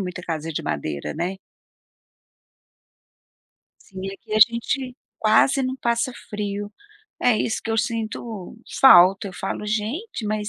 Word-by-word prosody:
muita 180 -1 -5
casa 165 -1 -4
de - - -3
madeira, 70 0 -3
né? 175 +4 -3 2.5
Assim, 190 -2 -10
aqui 205 - -11
a - - +3
gente 245 +3 +2 0.2
quase 225 +5 +4
não 260 0 -1
passa 235 0 0 0.2
frio. 205 0 -4 0.5
É 245 -3 +4
isso 220 - -1
que 225 - -3
eu 225 - 0
sinto 225 -2 -4 0.2
falta. 195 -5 +7
Eu - - -10
falo: 195 +3 -4
"Gente, 220 - -3
mas 210 0 -2
215 Hz, 130 wpm, -23 LUFS, 190-235 Hz, 2.5 s, falta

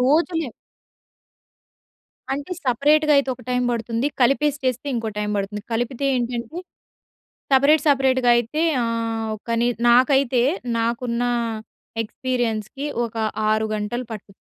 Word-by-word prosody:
రోజులే. 320 +3 +2 1.8
అంటే 285 +4 -4
సెపరేట్‌గైతే 285 +2 +3
ఒక 250 - -16
టై‌మ్ 250 0 +1
బడుతుంది, 230 +2 -1
కలిపేసి 280 +3 +3
చేస్తే 255 +2 -1
ఇంకో 230 -2 -2
టై‌మ్ 210 0 -1
బడుతుంది. 200 +1 -3
కలిపితే 245 +4 -2
ఏంటంటే 240 +4 -3 1.0
సెపరేట్ 285 +3 +5
సెపరేట్‌గైతే 260 0 +3 0.2
ఆహ్, 230 -1 -2
ఒక 215 - -16
ని 240 - +3 0.2
నాకైతే 255 0 +4 0.3
నాకున్న 235 +1 -1 0.8
ఎక్స్‌పీరియన్స్‌కి 245 +2 -3 0.2
ఒక 230 0 -8 0.3
6 215 0 +1
గంటలు 225 +4 -3
పటు 210 -2 -10
245 Hz, 105 wpm, -22 LUFS, 230-275 Hz, 1.8 s, సెపరేట్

